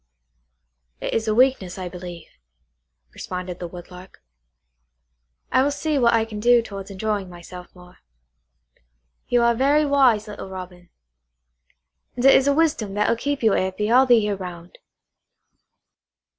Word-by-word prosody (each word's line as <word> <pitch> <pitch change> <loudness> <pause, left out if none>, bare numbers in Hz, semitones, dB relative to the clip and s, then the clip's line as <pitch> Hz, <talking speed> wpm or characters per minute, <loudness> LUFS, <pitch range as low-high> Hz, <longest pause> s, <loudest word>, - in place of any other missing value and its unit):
"It - - -4
is 225 0 -1
a 215 - +1
weakness, 245 -8 +2
I 185 -1 -5
believe," 175 -2 -9 0.9
responded 180 -1 -6
the 175 - -5
Woodlark. 180 +1 -12 1.3
"I - - +4
will 280 - +2
see 295 0 -1
what 235 -2 +4
I 225 -1 +1
can 215 -2 -8
do 240 +1 +4
towards 195 -2 -8
enjoying 200 -1 -3
myself 180 +1 -11
more. 180 0 -17 1.3
You 240 -1 +2
are 235 0 +4
very 280 +5 +2
wise, 260 -7 +3
little 205 -2 -8
Robin; 180 -2 -10 1.3
and 245 +1 -2
it 270 - +8
is 270 - +4
a 280 - +3
wisdom 285 -11 0
that 210 0 +1
will - - +2
keep 280 +3 -3
you 220 - +4
happy 195 +3 -1
all 260 +2 +5
the 245 - +6
year 210 -2 0
round." 180 -2 -10
210 Hz, 145 wpm, -22 LUFS, 180-245 Hz, 1.3 s, it